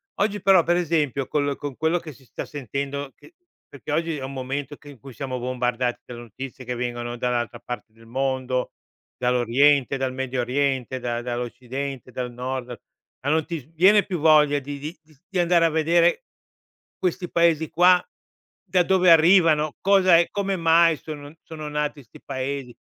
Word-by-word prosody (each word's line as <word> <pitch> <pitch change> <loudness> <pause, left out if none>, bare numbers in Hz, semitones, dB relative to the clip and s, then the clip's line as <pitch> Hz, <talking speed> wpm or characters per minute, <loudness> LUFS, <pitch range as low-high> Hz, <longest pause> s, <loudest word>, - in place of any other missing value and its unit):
oggi 205 0 -1
però 190 -3 +5
per 175 - +2
esempio 150 -6 0
col 145 -1 0
con 145 -3 -6
quello 160 +2 +1
che 160 -3 -10
si 130 +1 -21
sta - - -7
sentendo 140 +1 -5
che 340 - -19 0.3
perché - - -8
oggi 165 -1 -1
è 135 - -6
un 135 +1 -6
momento 135 +2 -4
che 145 - -15
in 140 -5 -13
cui 135 +3 -12
siamo 130 0 -4
bombardati 125 0 -2
dalle 120 -1 -9
notizie 125 +3 -9
che 125 - -3
vengono 120 0 -4
dall'altra 120 -1 -2
parte 120 -2 -8
del 115 0 -19
mondo, 130 0 -2 0.4
dall'oriente, 125 +3 +3
dal 130 -1 -1
Medio 130 -1 -3
Oriente, 130 0 -1
da 120 -1 -3
dall'occidente, 125 +2 -5
dal 125 -1 -4
nord, 125 +1 -5 0.5
ma 140 - -2
non 160 0 +2
ti 170 -2 -4
s 135 - -18
viene 195 +5 +5
più 185 - -2
voglia 150 -2 +5
di 140 +1 -7
di 155 +3 -7
di 155 0 -24
s 145 - -30
di 190 - -4
andare 170 -1 +4
a - - +3
vedere 170 - +2 0.7
questi 180 -1 -2
paesi 165 -2 +2
qua, 180 +1 +5 0.6
da 180 - +3
dove 185 -1 +4
arrivano 165 -3 +5
cosa 190 -3 +5
è 170 - +2
come 195 -1 -1
mai 165 -1 +4
sono 145 -2 -9
sono 155 -2 -7
nati 150 -1 -3
'sti 115 - -17
paesi, 135 -2 -4
140 Hz, 180 wpm, -24 LUFS, 125-165 Hz, 0.7 s, però